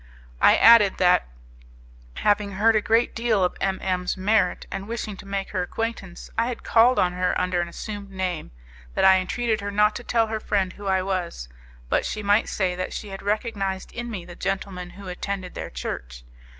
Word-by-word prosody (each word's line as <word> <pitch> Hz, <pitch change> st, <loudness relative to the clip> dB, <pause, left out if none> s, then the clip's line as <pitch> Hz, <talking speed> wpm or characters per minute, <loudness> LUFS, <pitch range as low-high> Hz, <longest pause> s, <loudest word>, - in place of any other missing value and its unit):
I -, -, +7 dB
added 225 Hz, -4 st, +7 dB
that, 180 Hz, -, +4 dB, 0.9 s
having 205 Hz, -, +1 dB
heard 220 Hz, +4 st, +3 dB
a 215 Hz, -, +3 dB
great 225 Hz, +3 st, +2 dB
deal 230 Hz, -4 st, +1 dB
of 180 Hz, -, 0 dB
M 195 Hz, -1 st, 0 dB
M 180 Hz, -1 st, -1 dB
's -, -, -1 dB
merit, 195 Hz, -1 st, +1 dB
and 195 Hz, +1 st, -5 dB
wishing 225 Hz, -2 st, -4 dB
to 195 Hz, -, -12 dB
make 195 Hz, 0 st, -3 dB
her 185 Hz, -, -1 dB
acquaintance, 195 Hz, -2 st, -4 dB
I 230 Hz, -, +2 dB
had 245 Hz, -, -5 dB
called 235 Hz, +3 st, +4 dB
on 180 Hz, -1 st, +2 dB
her 180 Hz, 0 st, 0 dB
under 180 Hz, -1 st, 0 dB
an 175 Hz, -, -3 dB
assumed 205 Hz, +3 st, -7 dB
name; 185 Hz, -4 st, -3 dB, 0.5 s
that -, -, +3 dB
I 190 Hz, 0 st, +7 dB
entreated 220 Hz, +3 st, -1 dB
her 200 Hz, -, -3 dB
not 210 Hz, +1 st, +3 dB
to 240 Hz, -, -9 dB
tell 230 Hz, -1 st, +2 dB
her 220 Hz, 0 st, -3 dB
friend 195 Hz, -3 st, -1 dB
who 205 Hz, -1 st, -9 dB
I 190 Hz, -1 st, +2 dB
was, 180 Hz, -, -3 dB, 0.4 s
but -, -, +1 dB
she 215 Hz, -, -4 dB
might 205 Hz, +2 st, +3 dB
say 185 Hz, -3 st, 0 dB
that 185 Hz, +1 st, -4 dB
she 210 Hz, -, -6 dB
had 195 Hz, 0 st, -7 dB
recognized 200 Hz, -2 st, -2 dB
in 240 Hz, 0 st, -5 dB
me 190 Hz, -6 st, -6 dB
the 175 Hz, -1 st, -10 dB
gentleman 190 Hz, -1 st, -3 dB
who 200 Hz, -1 st, -9 dB
attended 185 Hz, 0 st, -4 dB
their -, -, -6 dB
church. -, -, -6 dB
195 Hz, 205 wpm, -24 LUFS, 185-215 Hz, 0.9 s, I